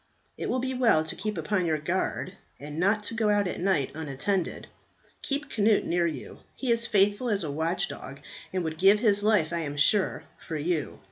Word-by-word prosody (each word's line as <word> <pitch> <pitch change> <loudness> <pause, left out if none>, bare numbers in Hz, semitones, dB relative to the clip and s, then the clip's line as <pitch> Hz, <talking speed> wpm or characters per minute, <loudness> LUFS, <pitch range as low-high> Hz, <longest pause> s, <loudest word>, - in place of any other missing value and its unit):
It - - -4
will 255 - +1
be 260 +1 -2
well 235 -11 +3
to 160 - -2
keep 215 0 -4
upon 190 -5 0
your 155 -1 +1
guard, 180 +3 -2 0.3
and 150 +2 -7
not 210 +3 +2
go 220 -2 +1
out 205 -2 +2
at - - -4
night 175 -7 +1
unattended. 160 +5 -2 0.6
Keep 285 +1 -3
Cnut 215 0 +3
near 170 0 +1
you; 150 -6 -7 0.2
he 260 -3 -1
is 230 0 +1
faithful 205 +4 +2
as 205 -3 +1
a 150 - -3
watch 160 +4 -1
dog, 140 +1 -8 0.3
and 185 -1 -1
would 160 -1 -4
give 195 +2 +6
his 205 -2 +3
life, 210 -8 +3
I 170 - 0
am 145 -3 -4
sure, 190 +7 +2 0.2
for 160 - -5
you. 155 0 -2
185 Hz, 200 wpm, -27 LUFS, 160-210 Hz, 0.6 s, give